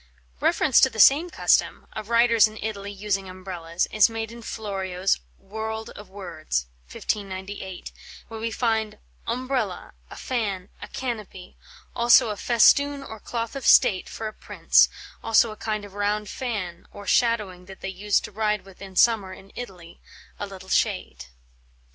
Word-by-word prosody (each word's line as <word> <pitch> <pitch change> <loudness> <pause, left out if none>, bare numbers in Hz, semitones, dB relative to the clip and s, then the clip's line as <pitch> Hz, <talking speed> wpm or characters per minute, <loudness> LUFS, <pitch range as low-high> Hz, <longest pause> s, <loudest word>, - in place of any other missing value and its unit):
Reference 260 - +4
to 265 - +6
the 225 -3 -8
same 290 - +6
custom, - - +2
of 215 - -7
riders 230 -1 +5
in 215 0 -11
Italy 205 -2 -5
using 195 -1 -2
umbrellas, 180 -2 -3
is 215 +1 +5
made 225 0 -4
in 235 0 -10
Florio's 195 -4 -2 0.2
"Worlde 220 +2 -5
of 205 -2 -12
Wordes" 155 - -4 0.3
(1598), 190 -2 -5 0.4
where 225 -1 -8
we 230 +1 -2
find 220 -2 -1 0.3
"Ombrella, 250 -5 -2 0.2
a - - -10
fan, 205 -7 -3
a - - -7
canopie, 215 -7 -6 0.4
also 235 -1 +6
a - - -3
festoon 280 +6 +4
or 220 -4 -9
cloth 230 +3 -4
of 275 - -5
State 185 -5 +5
for 220 - -5
a 215 - -7
prince, - - +3 0.3
also 225 0 +4
a - - -8
kind 215 -1 -3
of 200 - -13
round 205 +1 -1
fan 200 -9 -4
or 205 - -10
shadowing 210 -7 +1
that 190 0 -12
they - - -4
use 200 +2 +1
to - - -8
ride 210 -1 -1
with 195 -1 -16
in 195 -1 -10
sommer 205 -2 +3
in 195 +1 -14
Italy, 180 -8 -9 0.4
a 205 - -3
little 190 -1 -11
shade." 185 - 0
210 Hz, 160 wpm, -25 LUFS, 190-230 Hz, 0.4 s, to